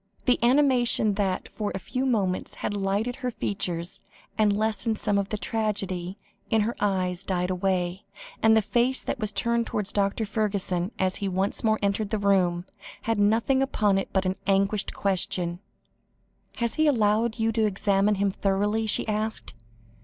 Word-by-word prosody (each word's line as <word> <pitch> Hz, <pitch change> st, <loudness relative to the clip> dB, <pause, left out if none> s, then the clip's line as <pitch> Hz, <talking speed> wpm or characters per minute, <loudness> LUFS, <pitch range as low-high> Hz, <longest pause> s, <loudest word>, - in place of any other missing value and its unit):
The 250 Hz, -, +3 dB
animation 245 Hz, -4 st, +3 dB
that 195 Hz, -2 st, -1 dB
for 210 Hz, -2 st, -4 dB
a -, -, -1 dB
few 255 Hz, +7 st, -3 dB
moments 195 Hz, -7 st, -1 dB
had -, -, -3 dB
lighted 205 Hz, +4 st, -1 dB
her 250 Hz, -, -2 dB
features, 180 Hz, -6 st, -3 dB, 0.3 s
and 210 Hz, -2 st, +2 dB
lessened 220 Hz, 0 st, 0 dB
some 205 Hz, -1 st, +1 dB
of 200 Hz, 0 st, -3 dB
the 215 Hz, -, -2 dB
tragedy, 195 Hz, -4 st, -2 dB, 0.3 s
in 220 Hz, -1 st, +3 dB
her 230 Hz, +3 st, -1 dB
eyes 185 Hz, -2 st, 0 dB
died 180 Hz, -1 st, -1 dB
away, 185 Hz, 0 st, -1 dB, 0.4 s
and 220 Hz, 0 st, +5 dB
the 220 Hz, -, +3 dB
face 240 Hz, +5 st, +2 dB
that 270 Hz, -, -3 dB
was 215 Hz, -2 st, -2 dB
turned 235 Hz, +2 st, 0 dB
towards 205 Hz, -2 st, -1 dB
Dr. 200 Hz, +2 st, 0 dB
Fergusson, 200 Hz, -4 st, -1 dB
as 185 Hz, -1 st, +1 dB
he 200 Hz, -, -3 dB
once 190 Hz, +4 st, -1 dB
more 220 Hz, -1 st, +3 dB
entered 200 Hz, +1 st, 0 dB
the 220 Hz, -, 0 dB
room, 185 Hz, -4 st, +2 dB, 0.4 s
had 225 Hz, -2 st, 0 dB
nothing 225 Hz, +6 st, +3 dB
upon 210 Hz, -7 st, +2 dB
it 195 Hz, -, -4 dB
but 190 Hz, -1 st, 0 dB
an 185 Hz, +1 st, -1 dB
agonised 195 Hz, +1 st, +2 dB
question. 185 Hz, -3 st, 0 dB, 0.9 s
"He -, -, -12 dB
has 235 Hz, +5 st, -3 dB
allowed 230 Hz, -6 st, +2 dB
you 225 Hz, 0 st, +1 dB
to 220 Hz, -1 st, +2 dB
examine 200 Hz, +1 st, +1 dB
him 200 Hz, 0 st, +1 dB
thoroughly?" 205 Hz, +3 st, 0 dB
she 215 Hz, -, 0 dB
asked. 215 Hz, -, -2 dB
205 Hz, 170 wpm, -26 LUFS, 195-220 Hz, 0.9 s, and